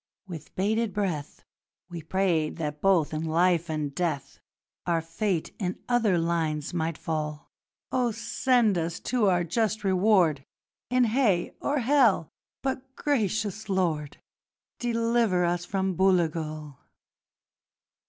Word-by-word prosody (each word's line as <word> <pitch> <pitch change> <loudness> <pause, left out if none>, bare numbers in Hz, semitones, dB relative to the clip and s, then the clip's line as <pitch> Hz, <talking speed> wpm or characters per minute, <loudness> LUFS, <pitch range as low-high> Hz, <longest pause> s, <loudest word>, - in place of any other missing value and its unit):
With 165 -5 -9
bated 215 +2 0
breath 175 -8 -3 0.4
We 175 -2 -7
prayed 165 -2 0
that 150 -2 -4
both 180 -6 +3
in 155 +1 -2
life 170 +1 +2
and 150 -2 -2
death 140 -5 -3 0.5
Our 170 -1 +2
fate 165 +2 -2
in 185 -3 -2
other 230 -7 +2
lines 165 -2 -1
might 165 -2 -1
fall: 155 -2 -4 0.4
'Oh, 250 -2 +1
send 230 -2 +1
us 165 +1 -3
to 240 -5 +1
our 175 -2 +3
just 215 +5 -1
reward 185 -6 +3 0.5
In 250 +1 +3
Hay 225 -6 +2
or 290 - 0
Hell, 235 - +3 0.3
but, 265 0 -4
gracious 215 -5 -1
Lord, 165 -6 -1 0.6
Deliver 230 -6 +1
us 175 0 -1
from 190 0 -1
Booligal!' 155 -6 0
180 Hz, 120 wpm, -27 LUFS, 160-220 Hz, 0.6 s, both